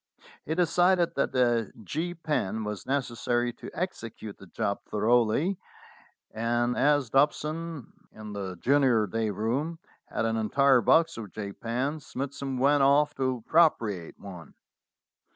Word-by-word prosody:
He 160 - -1
decided 175 +1 +3
that 140 - -1
a 120 -4 +2
"J" 165 - -3
pen 150 - -2
was 105 -1 -5
neces 130 -3 -2
sary 120 0 0
to - - -10
execute 115 - -5
the 95 - -13
job 100 +3 -2
thoroughly, 120 - +2 0.7
and 120 +2 0
as 145 -3 +2
Dobson 150 +1 0 0.2
in 110 -1 -9
the 95 -2 -5
junior 130 - +3
day 110 +2 -2
room 120 - -2 0.3
had - - -2
an 115 0 0
entire 130 +4 +3
box 165 +8 +3
of 105 -5 -7
"J" 100 -2 -6
pens, 135 +8 -3
Smithson 135 0 -4
went 140 +3 +3
off 145 +2 +4
to 130 -3 -1
appropriate 115 - +2
one. 90 -6 -11
125 Hz, 135 wpm, -28 LUFS, 110-150 Hz, 0.7 s, off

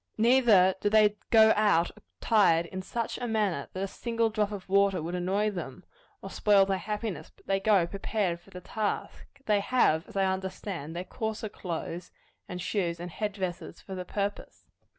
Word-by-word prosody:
Neither 220 -5 +5
do 205 - +2
they 210 -1 +4
go 220 -1 +7
out 205 -5 +3
attired 180 -7 +2
in 185 +2 -6
such 230 +4 -4
a 245 - -3
manner 210 -10 -1
that 185 - -3
a - - -1
single 230 +2 -1
drop 210 -1 0
of 200 -3 -7
water 200 0 +3
would 165 +2 -5
annoy 195 +4 0
them, 175 -3 -7 0.4
or 195 - -7
spoil 200 -2 +4
their 195 -1 -1
happiness; 210 +2 -4
but - - -25
they 195 0 +1
go 195 -3 +3
prepared 195 -1 -2
for 170 - -21
the 180 - -10
task. 210 +3 -4 0.2
They 210 -1 +3
have, 200 -8 +2
as - - -15
I 195 - +3
understand, 190 -4 -4
their 175 - -3
coarser 220 +1 -4
clothes, 175 -2 -6 0.4
and 180 - -5
shoes, 175 -2 -2
and 175 0 -6
head 205 +6 -3
dresses, 185 -3 -5
for 190 - -9
the 185 -1 -4
purpose. 200 +2 -5
195 Hz, 185 wpm, -28 LUFS, 180-215 Hz, 0.4 s, go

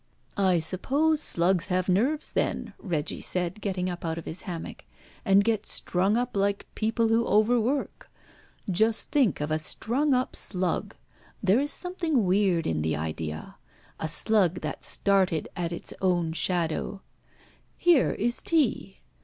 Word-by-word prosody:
"I 190 -3 +3
suppose 275 - +1
slugs 175 - +1
have 185 -1 0
nerves, 250 - +2
then," - - -1
Reggie 165 -7 -3
said, 180 +3 -1
getting 185 -3 -2
up 175 -1 -5
out 165 -1 -2
of 165 - -7
his 160 - -5
hammock, 170 -2 -6 0.4
"and 195 +1 +5
get 220 -1 0
strung 190 +5 +1
up 245 -1 -2
like 200 0 0
people 225 +1 0
who 225 +1 +3
over 215 +3 +4
work. 265 +5 -2 0.6
Just 215 +4 +1
think 255 - +2
of 150 +1 -2
a 155 - +1
strung 255 - 0
up 255 0 -1
slug! 185 -2 -2 0.5
There 195 +5 +4
is 290 +1 -1
something 335 - 0
weird 185 -2 +2
in 80 -1 0
the 80 0 0
idea. 80 0 -5 0.4
A 160 - -2
slug 180 +1 +2
that - - -5
started 190 -5 +1
at 175 -1 -2
its 170 - -5
own 175 -3 +1
shadow. 170 +3 -1 0.7
Here 345 -7 +4
is 240 +3 -1
tea! 270 - 0
195 Hz, 150 wpm, -27 LUFS, 170-230 Hz, 0.7 s, and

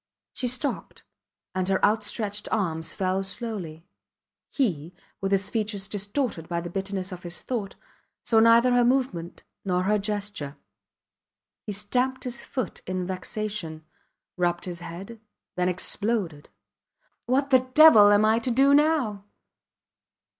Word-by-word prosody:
She 250 - -2
stopped, 255 +4 -3 0.5
and 185 0 -1
her 190 - +3
outstretched 210 0 -1
arms 165 -6 0
fell 190 0 -1
slowly. 195 -6 -5 0.6
He, 175 - -1 0.3
with 195 0 -1
his 195 -1 +1
features 210 -3 -2
distorted 205 - -3
by 170 -1 -1
the 170 0 -6
bitterness 195 0 -3
of 180 -1 -7
his 175 0 -6
thought, 220 -6 -4 0.5
saw 225 -2 +3
neither 230 +2 +6
her 245 0 +4
movement 240 -10 -1 0.2
nor 180 -2 0
her 210 +2 +2
gesture. 200 -8 -4 1.1
He 205 - -3
stamped 250 +6 -1
his 250 0 -5
foot 255 - -4
in 185 -1 -2
vexation, 185 -3 -4 0.5
rubbed 175 -1 0
his 175 -2 -6
head 190 +7 -9 0.4
then 180 0 +1
exploded. 185 -4 -2 0.8
What 275 +3 +1
the 260 - +7 0.2
devil 300 -10 +9
am 205 +1 +5
I 220 +1 +3
to 235 - -3
do 270 +4 +4
now? 285 -10 +2
205 Hz, 130 wpm, -26 LUFS, 180-235 Hz, 1.1 s, devil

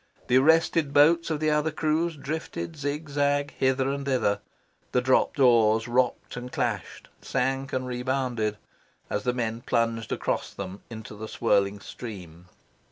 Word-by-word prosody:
The 125 - +5
arrested 160 0 +3
boats 165 +4 +5
of 155 -2 -1
the 155 0 +2
other 150 +1 +2
crews 160 +2 0
drifted 160 +3 -5
zigzag 145 -1 -1
hither 130 0 +2
and 140 0 -3
thither. 130 -7 +1 0.5
The 125 - +3
dropped 130 +3 +2
oars 115 -3 +5
rocked 125 +1 0
and 125 0 -6
clashed, 115 -7 -3
sank 135 +1 -1
and 130 0 -1
rebounded, 125 -4 -1 0.5
as 105 - -2
the 125 - +2
men 115 -2 -2
plunged 115 -2 0
across - - -2
them 100 0 -6
into 110 -2 -8
the 110 +1 -7
swirling 100 -3 +1
stream. 90 -7 -9
130 Hz, 145 wpm, -26 LUFS, 115-145 Hz, 0.5 s, The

